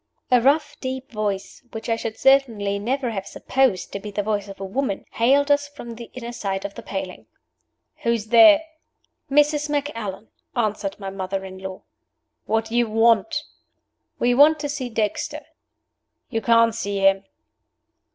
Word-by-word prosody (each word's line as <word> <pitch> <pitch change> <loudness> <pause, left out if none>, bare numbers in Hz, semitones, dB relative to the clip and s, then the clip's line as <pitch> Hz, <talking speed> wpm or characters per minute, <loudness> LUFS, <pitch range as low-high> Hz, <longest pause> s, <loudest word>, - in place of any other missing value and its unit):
A 250 -1 +6
rough, 290 +3 +2
deep 260 0 -5
voice, 205 -3 -3
which 225 - -6
I 230 - +2
should 225 -1 -5
certainly 225 -7 +3
never 250 +3 -1
have 195 -2 -5
supposed 255 -7 0
to 200 - -3
be 210 +1 -7
the 205 0 -2
voice 205 -1 -1
of 195 -1 -10
a 195 - -4
woman, 215 +1 -2
hailed 280 +5 +3
us 285 0 +3
from 285 -5 -9
the 235 0 -10
inner 240 -2 -6
side 195 -4 -3
of 200 - -5
the - - -9
paling. 190 -2 -6 0.7
"Who's 235 -2 -1
there?" 300 +7 +8 0.7
"Mrs. 295 +1 +3
Macallan," 230 -9 -3 0.3
answered 210 -4 -1
my 195 -1 -5
mother 190 0 -4
in 190 0 -9
law. 190 0 -7 0.6
"What 220 +1 +1
do 225 +1 -6
you 240 -2 +2
want?" 225 -1 +3 0.7
"We 245 0 +2
want 295 +4 +6
to 290 - -3
see 265 -4 -3
Dexter." 225 +7 -2 0.9
"You 225 -2 -1
can't 230 0 +4
see 205 -3 -3
him." 195 0 +3
225 Hz, 160 wpm, -23 LUFS, 200-265 Hz, 0.9 s, there